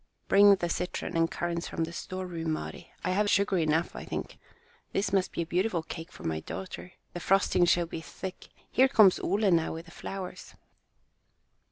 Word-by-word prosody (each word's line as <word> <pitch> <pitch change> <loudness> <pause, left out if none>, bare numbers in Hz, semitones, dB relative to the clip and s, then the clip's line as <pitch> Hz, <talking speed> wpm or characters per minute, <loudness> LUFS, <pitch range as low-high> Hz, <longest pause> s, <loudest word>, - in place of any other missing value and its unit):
"Bring 200 0 +7
the 175 -2 -2
citron 180 +1 -3
and 165 0 +3
currants 170 0 -3
from 165 - -2
the 165 +1 -4
storeroom, 175 -3 -4
Mari. - - -6
I - - 0
have 205 +2 +2
sugar 200 -2 +3
enough, 160 +1 +1
I - - -6
think. - - -5 0.5
This 195 0 0
must 190 -2 +2
be 170 - -2
a - - -8
beautiful 180 0 0
cake 165 +2 -8
for - - -12
my 80 -1 -1
daughter. 180 - -7 0.2
The 175 - -4
frosting 190 -1 +3
shall 175 0 +3
be 165 -1 -6
thick. 180 +5 -8 0.2
Here 260 +2 +5
comes 215 -8 +6
Ole 200 +1 +2
now 165 -2 +2
with 165 +1 -7
the 170 - -14
flowers." 185 0 -7
180 Hz, 185 wpm, -29 LUFS, 165-195 Hz, 0.5 s, Bring